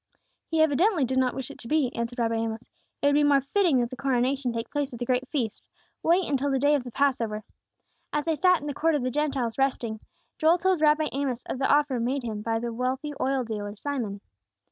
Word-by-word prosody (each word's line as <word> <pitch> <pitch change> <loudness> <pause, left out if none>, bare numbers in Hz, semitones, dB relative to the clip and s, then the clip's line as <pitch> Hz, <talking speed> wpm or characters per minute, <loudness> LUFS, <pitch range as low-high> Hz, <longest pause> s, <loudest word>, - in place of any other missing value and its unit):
"He 325 -1 +1
evidently 315 +1 +3
did 260 +1 0
not 255 -1 +1
wish 265 -2 -5
it - - -13
to 235 - -9
be," 295 -3 +1
answered 235 +1 -3
Rabbi 230 -1 +1
Amos. 225 0 -3 0.3
"It - - +3
would 285 - +5
be 295 +1 +4
more 285 -1 +4
fitting 295 -2 +2
that 240 +1 -2
the - - -5
coronation 260 0 0
take 230 0 -5
place 290 -2 -1
at 240 - -7
the 245 - -3
great 255 +1 0
feast. 240 -7 -2 0.4
Wait 345 +3 +3
until 285 0 0
the 270 - +1
day 285 +3 +3
of 285 -4 +1
the 245 - -7
Passover." 230 -6 0 0.7
As 295 0 -1
they 325 -1 +1
sat 365 0 +4
in - - -7
the 290 - -3
Court 320 +2 +1
of 285 - -1
the 255 - -1
Gentiles, 275 -5 -1
resting, 240 -5 0 0.4
Joel 320 +3 +5
told 370 -2 +1
Rabbi 305 0 +3
Amos 265 -3 -2
of 255 - -4
the 270 - +2
offer 290 -3 +3
made 255 +3 -1
him 215 -3 -4
by 225 +1 -1
the 235 0 -3
wealthy 260 +5 -2
oil 265 -1 +1
dealer 210 -2 -5
Simon. 220 -6 -4
265 Hz, 230 wpm, -26 LUFS, 240-295 Hz, 0.7 s, would